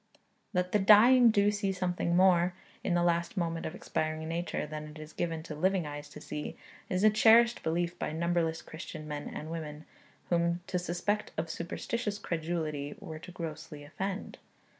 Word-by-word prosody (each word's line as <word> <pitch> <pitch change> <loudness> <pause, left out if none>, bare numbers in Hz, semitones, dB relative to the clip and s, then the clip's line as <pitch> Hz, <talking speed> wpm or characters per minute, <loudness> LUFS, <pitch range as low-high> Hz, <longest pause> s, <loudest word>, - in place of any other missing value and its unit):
That 180 0 0
the 210 - +3
dying 230 +5 +8
do 205 -1 +4
see 205 -1 -1
something 180 -2 -1
more, 180 -1 +4 0.3
in 175 - +1
the 175 - +3
last 170 +2 +1
moment 165 -2 -1
of 160 - -6
expiring 155 -3 -2
nature, 170 0 -2
than 150 0 -6
it 150 +1 -11
is 155 0 -10
given 165 -2 -2
to 160 - -7
living 185 +3 +1
eyes 145 0 -7
to - - -10
see, 150 - -6 0.3
is 185 +1 0
a 215 - +7
cherished 230 +2 +6
belief 170 +2 -1
by - - -2
numberless 165 0 0
Christian 160 -1 -8
men 145 -1 -4
and 155 +2 -6
women, 155 -2 -6 0.5
whom 170 0 +2
to 180 - -1
suspect 180 +4 -2
of 160 +1 -2
superstitious 205 +6 -3
credulity 160 -5 -3
were 160 -7 -7
to 180 - -10
grossly 155 -3 -7
offend. 190 +7 -5
170 Hz, 175 wpm, -31 LUFS, 155-190 Hz, 0.5 s, dying